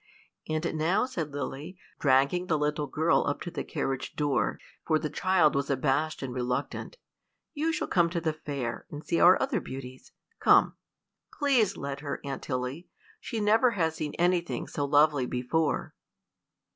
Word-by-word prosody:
"And 155 Hz, +2 st, -1 dB
now," 160 Hz, +8 st, +1 dB
said 170 Hz, -, -4 dB
Lily, 145 Hz, +5 st, -5 dB, 0.2 s
dragging 140 Hz, +6 st, +3 dB
the 160 Hz, -, +2 dB, 0.3 s
girl 160 Hz, +4 st, +2 dB
up 145 Hz, -, -1 dB
to 175 Hz, -, -5 dB
the -, -, -4 dB
carriage 135 Hz, -4 st, -3 dB
door, 145 Hz, -2 st, 0 dB, 0.3 s
for 155 Hz, -, +2 dB
the 155 Hz, -1 st, -4 dB
child 185 Hz, -5 st, +3 dB
was 140 Hz, +1 st, -1 dB
abashed 140 Hz, +3 st, 0 dB
and 130 Hz, -2 st, -4 dB
reluctant, 125 Hz, -, -3 dB, 0.6 s
"you 320 Hz, +1 st, 0 dB
shall 315 Hz, -, -2 dB
come 170 Hz, -2 st, +3 dB
to 170 Hz, 0 st, -2 dB
the 160 Hz, -1 st, -1 dB
Fair, 140 Hz, -6 st, -5 dB
and 150 Hz, +1 st, -8 dB
see 170 Hz, -, 0 dB
our 180 Hz, +1 st, +7 dB
other 265 Hz, -8 st, 0 dB
beauties: 130 Hz, -1 st, -9 dB, 0.3 s
come. -, -, +5 dB, 0.6 s
Please 255 Hz, -9 st, +2 dB
let 140 Hz, 0 st, -4 dB
her, 145 Hz, -1 st, -4 dB
Aunt 135 Hz, -1 st, -4 dB
Tilly; 130 Hz, +5 st, -4 dB, 0.3 s
she 230 Hz, -, -4 dB
never 220 Hz, +4 st, +4 dB
has 165 Hz, -2 st, +1 dB
seen 155 Hz, -2 st, -4 dB
anything 175 Hz, 0 st, 0 dB
so 145 Hz, -, -3 dB
lovely 145 Hz, -2 st, +3 dB
before." 125 Hz, +6 st, -1 dB
155 Hz, 160 wpm, -28 LUFS, 140-175 Hz, 0.6 s, our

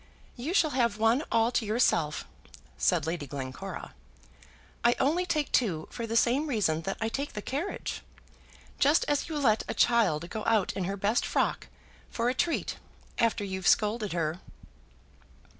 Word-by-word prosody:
"You 285 Hz, +9 st, -3 dB
shall 315 Hz, -6 st, +4 dB
have 235 Hz, -5 st, +1 dB
one 225 Hz, +6 st, +3 dB
all 230 Hz, +1 st, +3 dB
to 245 Hz, -, +1 dB
yourself," 210 Hz, -9 st, +1 dB, 0.5 s
said -, -, +1 dB
Lady 160 Hz, -3 st, -3 dB
Glencora. 135 Hz, +8 st, -6 dB, 0.9 s
"I 240 Hz, 0 st, +4 dB
only 340 Hz, +6 st, +1 dB
take 305 Hz, -4 st, 0 dB
two 180 Hz, -11 st, +1 dB
for 230 Hz, -1 st, -5 dB
the 225 Hz, -, -3 dB
same 260 Hz, +7 st, +2 dB
reason 200 Hz, -, +1 dB
that 195 Hz, -, -3 dB
I 225 Hz, -, 0 dB
take 275 Hz, +5 st, -3 dB
the 210 Hz, -, -5 dB
carriage, 295 Hz, +9 st, -4 dB, 0.8 s
just 290 Hz, +4 st, +4 dB
as 290 Hz, +2 st, 0 dB
you 310 Hz, -, -3 dB
let 225 Hz, -7 st, +3 dB
a -, -, -3 dB
child 195 Hz, -10 st, +3 dB
go 220 Hz, -1 st, -4 dB
out 220 Hz, -4 st, +2 dB
in 190 Hz, -, -2 dB
her 195 Hz, +2 st, -3 dB
best 205 Hz, +4 st, +1 dB
frock, -, -, 0 dB, 0.4 s
for 235 Hz, +1 st, 0 dB
a -, -, +1 dB
treat, 330 Hz, +5 st, -1 dB, 0.4 s
after 230 Hz, -2 st, +2 dB
you've 190 Hz, -2 st, -3 dB
scolded 210 Hz, -1 st, +2 dB
her." 165 Hz, 0 st, -1 dB
225 Hz, 160 wpm, -29 LUFS, 195-265 Hz, 0.9 s, shall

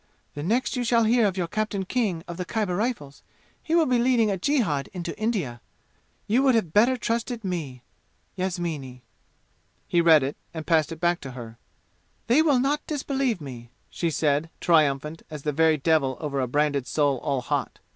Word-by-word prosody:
The 145 Hz, -, -6 dB
next 230 Hz, -, 0 dB
you 250 Hz, -, -1 dB
shall 235 Hz, -1 st, +3 dB
hear 225 Hz, 0 st, +4 dB
of 190 Hz, -1 st, -3 dB
your 180 Hz, -, 0 dB
Captain 210 Hz, 0 st, -2 dB
King 190 Hz, -7 st, -1 dB
of 175 Hz, -, -7 dB
the 180 Hz, -, -2 dB
Khyber 200 Hz, -1 st, -2 dB
Rifles, 200 Hz, -, -3 dB, 0.4 s
he 325 Hz, -, -1 dB
will 335 Hz, -2 st, +5 dB
be 250 Hz, -3 st, +2 dB
leading 235 Hz, -3 st, +3 dB
a 195 Hz, -, -1 dB
jihad 195 Hz, -, 0 dB
into 175 Hz, -2 st, -5 dB
India. 195 Hz, -, -2 dB, 0.6 s
You 235 Hz, +5 st, +2 dB
would 265 Hz, -3 st, +4 dB
have 180 Hz, -9 st, 0 dB
better 240 Hz, +5 st, +4 dB
trusted 230 Hz, 0 st, -2 dB
me. 155 Hz, -10 st, -4 dB, 0.5 s
Yasmini." 170 Hz, -9 st, -4 dB, 0.8 s
He 170 Hz, -, +3 dB
read 160 Hz, -4 st, +6 dB
it 135 Hz, +2 st, -3 dB, 0.2 s
and 160 Hz, -1 st, -5 dB
passed 160 Hz, -2 st, +2 dB
it 165 Hz, -, -7 dB
back 175 Hz, +1 st, +1 dB
to 130 Hz, -2 st, -8 dB
her. 115 Hz, -2 st, -9 dB, 0.7 s
"They 245 Hz, +7 st, +4 dB
will 295 Hz, -5 st, +3 dB
not 280 Hz, +4 st, +1 dB
disbelieve 270 Hz, -, -1 dB
me," 120 Hz, -4 st, -9 dB, 0.2 s
she 170 Hz, -, -1 dB
said, 150 Hz, +1 st, 0 dB
triumphant 150 Hz, -1 st, +2 dB
as 150 Hz, -3 st, -8 dB
the 150 Hz, -, 0 dB
very 160 Hz, +1 st, +3 dB
devil 140 Hz, -3 st, +1 dB
over 145 Hz, -3 st, -3 dB
a 130 Hz, -, -1 dB
branded 145 Hz, 0 st, 0 dB
soul 145 Hz, -4 st, +1 dB
all 135 Hz, 0 st, -1 dB
hot. -, -, -2 dB
175 Hz, 185 wpm, -25 LUFS, 145-230 Hz, 0.8 s, read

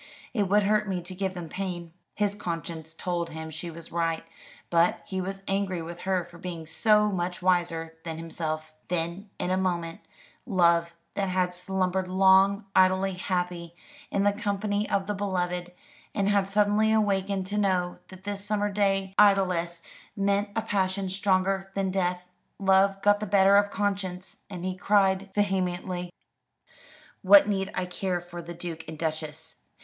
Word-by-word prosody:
"It 205 Hz, -6 st, 0 dB
would 205 Hz, +1 st, +4 dB
hurt 210 Hz, +1 st, +2 dB
me 185 Hz, -2 st, -1 dB
to 180 Hz, +2 st, -8 dB
give 190 Hz, 0 st, -3 dB
them 175 Hz, -2 st, -6 dB
pain." 175 Hz, -2 st, -5 dB, 0.2 s
His 205 Hz, -1 st, +1 dB
conscience 165 Hz, -4 st, -5 dB
told 170 Hz, -1 st, -2 dB
him 160 Hz, 0 st, -7 dB
she 160 Hz, +3 st, -5 dB
was 165 Hz, 0 st, -10 dB
right, 165 Hz, -1 st, 0 dB, 0.5 s
but 170 Hz, 0 st, +3 dB
he 190 Hz, -1 st, -3 dB
was 195 Hz, +1 st, -5 dB
angry 195 Hz, -2 st, 0 dB
with 170 Hz, +1 st, -7 dB
her 185 Hz, -2 st, 0 dB
for 170 Hz, 0 st, -15 dB
being 170 Hz, -2 st, -6 dB
so 210 Hz, +5 st, +3 dB
much 180 Hz, -1 st, -3 dB
wiser 170 Hz, -3 st, +1 dB
than 160 Hz, -1 st, -5 dB
himself. 155 Hz, -1 st, -4 dB
Then, 175 Hz, +4 st, -2 dB
in 180 Hz, -, -2 dB
a 185 Hz, -, +2 dB
moment, 170 Hz, -3 st, -2 dB, 0.4 s
love 170 Hz, -4 st, +2 dB, 0.2 s
that 195 Hz, -1 st, -1 dB
had 180 Hz, -1 st, +1 dB
slumbered 185 Hz, 0 st, -1 dB
long, 190 Hz, +2 st, +4 dB
idly 190 Hz, +1 st, +4 dB
happy 180 Hz, -2 st, -3 dB, 0.3 s
in 200 Hz, -, +1 dB
the 205 Hz, 0 st, +3 dB
company 205 Hz, -1 st, -1 dB
of 195 Hz, -1 st, +1 dB
the 210 Hz, -, -2 dB
beloved, 180 Hz, -3 st, -2 dB, 0.4 s
and 200 Hz, -1 st, +1 dB
had 200 Hz, -2 st, +2 dB
suddenly 210 Hz, +2 st, +3 dB
awakened 200 Hz, -3 st, +1 dB
to 205 Hz, +2 st, -2 dB
know 185 Hz, -3 st, 0 dB
that 185 Hz, 0 st, -13 dB
this 200 Hz, 0 st, -2 dB
summer 205 Hz, 0 st, 0 dB
day 195 Hz, -1 st, +1 dB
idlesse 180 Hz, -4 st, +3 dB, 0.3 s
meant 200 Hz, 0 st, +1 dB
a 225 Hz, -, 0 dB
passion 195 Hz, -2 st, 0 dB
stronger 195 Hz, 0 st, +1 dB
than 195 Hz, -1 st, 0 dB
death 180 Hz, -1 st, -1 dB, 0.3 s
love 195 Hz, 0 st, +3 dB
got 205 Hz, 0 st, +5 dB
the 215 Hz, -, -4 dB
better 195 Hz, 0 st, +5 dB
of 205 Hz, 0 st, +4 dB
conscience, 195 Hz, -3 st, -3 dB
and 180 Hz, -2 st, -6 dB
he 185 Hz, 0 st, -2 dB
cried 195 Hz, 0 st, +2 dB
vehemently: 180 Hz, -3 st, -1 dB, 1.1 s
"What 200 Hz, +1 st, +8 dB
need 195 Hz, -2 st, -1 dB
I 180 Hz, -, -1 dB
care 180 Hz, 0 st, -2 dB
for 175 Hz, 0 st, -9 dB
the 170 Hz, +1 st, -8 dB
Duke 165 Hz, -2 st, -6 dB
and 160 Hz, 0 st, -7 dB
Duchess! 160 Hz, 0 st, -4 dB
185 Hz, 165 wpm, -27 LUFS, 175-200 Hz, 1.1 s, What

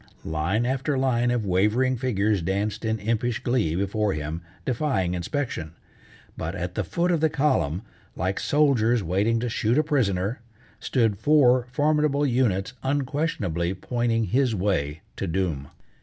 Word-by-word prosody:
Line 85 Hz, +9 st, 0 dB
after 135 Hz, +2 st, 0 dB
line 125 Hz, -2 st, +2 dB
of 120 Hz, -3 st, 0 dB
wavering 105 Hz, +8 st, +2 dB
figures 110 Hz, -5 st, 0 dB
danced 100 Hz, +5 st, -2 dB
in 110 Hz, 0 st, 0 dB
impish 115 Hz, +2 st, -1 dB
glee 120 Hz, -11 st, +1 dB
before 100 Hz, +2 st, 0 dB
him, 75 Hz, +2 st, -4 dB, 0.2 s
defying 125 Hz, -9 st, 0 dB
inspection. 90 Hz, -, -3 dB, 0.6 s
But 85 Hz, +4 st, -4 dB
at 90 Hz, -1 st, -4 dB
the -, -, -1 dB
foot 175 Hz, +1 st, 0 dB
of 170 Hz, -, +2 dB
the 160 Hz, -, +4 dB
column, 115 Hz, -, +1 dB, 0.3 s
like 95 Hz, +3 st, -1 dB
soldiers 125 Hz, -6 st, +2 dB
waiting 100 Hz, +7 st, +1 dB
to 125 Hz, -, -1 dB
shoot 115 Hz, +1 st, 0 dB
a 155 Hz, -, +4 dB
prisoner, 110 Hz, -, 0 dB, 0.4 s
stood 110 Hz, -6 st, +1 dB
four 125 Hz, -1 st, +4 dB
formidable 150 Hz, 0 st, +2 dB
units 120 Hz, -6 st, +1 dB
unquestionably 130 Hz, -, -1 dB
pointing 115 Hz, +3 st, 0 dB
his 125 Hz, +1 st, +1 dB
way 85 Hz, -6 st, -1 dB, 0.2 s
to 95 Hz, -, -2 dB
doom. 85 Hz, -6 st, -2 dB
110 Hz, 140 wpm, -25 LUFS, 95-130 Hz, 0.6 s, the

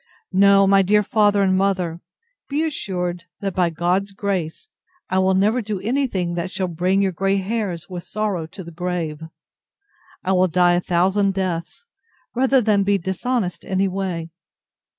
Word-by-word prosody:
No, 195 Hz, +1 st, +6 dB
my 195 Hz, 0 st, +5 dB
dear 210 Hz, +2 st, +3 dB
father 205 Hz, -1 st, +3 dB
and 190 Hz, -1 st, +3 dB
mother, 185 Hz, -3 st, 0 dB, 0.5 s
be 290 Hz, +3 st, 0 dB
assured, 180 Hz, -, -3 dB, 0.2 s
that, 195 Hz, -2 st, -2 dB
by 180 Hz, -1 st, +2 dB
God's 180 Hz, +4 st, -1 dB
grace, 195 Hz, -, -3 dB, 0.4 s
I 190 Hz, -, +2 dB
never 205 Hz, +5 st, +2 dB
will -, -, 0 dB
do 210 Hz, -3 st, -4 dB
any 260 Hz, +8 st, 0 dB
thing 180 Hz, -6 st, -2 dB
that 170 Hz, +1 st, -3 dB
shall 185 Hz, 0 st, -2 dB
bring 180 Hz, +3 st, +1 dB
your 190 Hz, -, +1 dB
grey 195 Hz, +3 st, 0 dB
hairs 195 Hz, -4 st, -3 dB
with 180 Hz, -2 st, -7 dB
sorrow 205 Hz, -6 st, -2 dB
to 185 Hz, +3 st, -10 dB
the 170 Hz, -, -10 dB
grave. 170 Hz, -3 st, -3 dB, 1.0 s
I 190 Hz, -, 0 dB
will 185 Hz, 0 st, +4 dB
die 175 Hz, +1 st, +3 dB
a 175 Hz, -, +2 dB
thousand 190 Hz, +3 st, +1 dB
deaths, 185 Hz, -, -3 dB, 0.5 s
rather 265 Hz, +1 st, +3 dB
than 210 Hz, -3 st, +2 dB
be 200 Hz, 0 st, +2 dB
dishonest 190 Hz, +2 st, -2 dB
any 190 Hz, +1 st, 0 dB
way. 180 Hz, -3 st, -3 dB
190 Hz, 165 wpm, -21 LUFS, 175-200 Hz, 1.0 s, No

